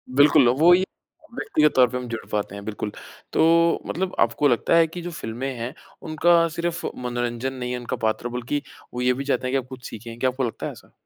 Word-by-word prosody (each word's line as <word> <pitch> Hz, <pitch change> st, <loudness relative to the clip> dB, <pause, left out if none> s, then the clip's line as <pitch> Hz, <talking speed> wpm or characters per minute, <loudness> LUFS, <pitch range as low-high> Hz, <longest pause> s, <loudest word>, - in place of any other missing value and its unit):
बिल्कुल, 145 Hz, -2 st, +6 dB
वो 155 Hz, +8 st, +6 dB
ये 185 Hz, +1 st, +4 dB, 0.5 s
व्यक्तिगत 155 Hz, -, +2 dB
तौर 125 Hz, -1 st, +6 dB
पर 125 Hz, -, -3 dB
हम 125 Hz, -1 st, -5 dB
जुड़ 115 Hz, -1 st, -5 dB
पाते 100 Hz, -1 st, -2 dB
हैं 100 Hz, -, -8 dB
बिल्कुल। 105 Hz, -1 st, -4 dB, 0.4 s
तो -, -, +3 dB, 0.4 s
मतलब 185 Hz, +2 st, -2 dB
आपको 145 Hz, -, +3 dB
लगता 125 Hz, +5 st, +2 dB
है 165 Hz, -1 st, +5 dB
कि 175 Hz, +2 st, -7 dB
जो 175 Hz, +1 st, -5 dB
फ़िल्में 130 Hz, -3 st, -4 dB
हैं 120 Hz, +3 st, -4 dB, 0.3 s
उनका 170 Hz, +1 st, +3 dB
सिर्फ़ 170 Hz, 0 st, -2 dB, 0.2 s
मनोरंजन 120 Hz, +1 st, -2 dB
नहीं 125 Hz, -1 st, -4 dB
है 125 Hz, -, -2 dB
उनका 120 Hz, -, -4 dB
पात्र 110 Hz, +2 st, 0 dB
बल्कि 125 Hz, +4 st, -2 dB, 0.3 s
वो 125 Hz, -, -3 dB
ये 125 Hz, 0 st, +3 dB
भी 135 Hz, +2 st, -4 dB
चाहते 135 Hz, -2 st, 0 dB
हैं -, -, -2 dB
कि -, -, +3 dB
आप 130 Hz, -2 st, -4 dB
कुछ 130 Hz, -1 st, -10 dB
सीखें। 115 Hz, +1 st, -9 dB
क्या 130 Hz, -, +2 dB
आपको 130 Hz, +1 st, -3 dB
लगता 115 Hz, -, -5 dB
है -, -, -3 dB
ऐसा? -, -, -16 dB
130 Hz, 230 wpm, -24 LUFS, 120-155 Hz, 0.5 s, बिल्कुल